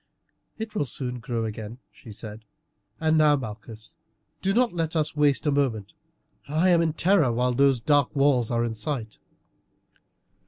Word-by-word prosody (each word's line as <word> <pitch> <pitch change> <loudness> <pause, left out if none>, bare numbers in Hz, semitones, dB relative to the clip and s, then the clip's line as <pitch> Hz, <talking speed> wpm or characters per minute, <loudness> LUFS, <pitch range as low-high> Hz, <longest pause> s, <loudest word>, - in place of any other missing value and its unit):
"It 220 -1 -6
will 150 -10 -1
soon 125 0 -4
grow 115 -1 -3
again," 110 +1 -6
she 115 - -13
said; 105 +1 -9 0.6
"and 160 0 +2
now, 150 -1 +5
Malchus, 110 -3 -8 0.5
do 195 - +1
not 235 -1 +2
let 165 -1 -2
us 155 -1 -1
waste 145 0 +2
a 150 - +2
moment. 120 -8 -1 0.5
I 160 +5 +2
am 170 -2 +5
in 160 -2 0
terror 170 -5 +3
while 125 +2 0
those 135 0 +3
dark 145 +3 +2
walls 135 -5 +2
are 115 -1 0
in 115 - -3
sight." 110 -1 -5
135 Hz, 160 wpm, -25 LUFS, 115-155 Hz, 0.6 s, now